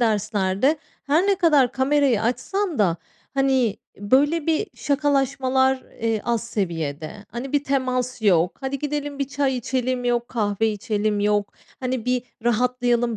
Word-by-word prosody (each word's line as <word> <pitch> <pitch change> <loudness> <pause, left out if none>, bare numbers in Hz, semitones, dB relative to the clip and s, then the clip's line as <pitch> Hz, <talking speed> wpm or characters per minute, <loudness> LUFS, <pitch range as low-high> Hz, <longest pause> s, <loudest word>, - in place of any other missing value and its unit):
derslerde 215 +4 +1 0.3
her 310 +7 +2
ne 400 - +4
kadar 300 - +3
kamerayı 265 -4 +2
açsan 305 - -1
da, 175 -5 +3 0.4
hani, 265 -6 +2 0.2
böyle, 285 - +2
bir 325 +6 +1
şakalaşmalar, 270 -2 +1 0.2
eee, 225 -1 0
az 235 -1 0
seviyede. 165 -3 -4
Hani, 255 +4 -6
bir 290 0 +1
temas 255 -3 -1
yok. 180 -3 +3
Hadi 270 +1 -3
gidelim, 290 0 -3
bir 275 -1 -1
çay 280 -2 0
içelim 250 0 -1
yok, 240 -1 0
kahve 215 -2 0
içelim, 210 -1 -1
yok. 205 0 +1 0.3
Hani, 255 -2 -2
bir 250 -1 +1 0.2
rahatlayalım 240 0 +1
250 Hz, 135 wpm, -23 LUFS, 215-275 Hz, 0.4 s, ne